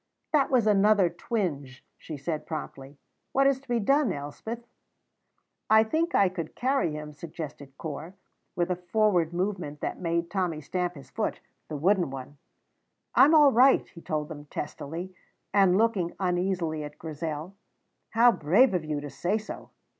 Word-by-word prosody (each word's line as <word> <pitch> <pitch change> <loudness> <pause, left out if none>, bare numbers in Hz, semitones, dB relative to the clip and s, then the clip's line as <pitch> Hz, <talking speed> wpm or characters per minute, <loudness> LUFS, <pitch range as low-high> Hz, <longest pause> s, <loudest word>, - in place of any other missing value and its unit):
"That 285 -3 +4
was 250 -5 +3
another 205 -3 +4
twinge," 160 - -3
she 155 - -8
said 155 +2 -4
promptly. 145 -3 -7 0.4
"What 275 +1 +4
is 275 -1 +3
to 275 - -25
be 240 -1 +2
done, 275 +2 +3
Elspeth?" 185 +11 -6 1.0
"I 220 0 +7
think 320 +9 0
I 200 - +5
could 175 -4 -5
carry 260 - +1
him," 150 0 -6
suggested 145 -3 -8
Corp, 160 +4 -6 0.4
with 175 +1 0
a - - +1
forward 180 -2 +1
movement 180 -5 -3
that - - -3
made 170 -1 -1
Tommy 180 -5 -1
stamp 180 +4 -2
his 140 - -13
foot - - -2 0.3
the 150 - -4
wooden 180 +2 +2
one. 135 +1 -8 0.7
"I - - +8
am 310 +3 +5
all 295 -3 +7
right," 260 +3 +5
he 170 - -13
told 155 -2 -2
them 150 -2 -9
testily, 165 +5 -6 0.4
and 195 -2 +5
looking 205 -6 +1
uneasily 180 -4 0
at 150 0 -9
Grizel. 155 +2 -5 0.6
"How 235 +2 +6
brave 205 - +4
of 180 -3 0
you 150 -2 -3
to 145 - -6
say 200 +5 0
so!" 215 0 -8
175 Hz, 160 wpm, -27 LUFS, 150-215 Hz, 1.0 s, I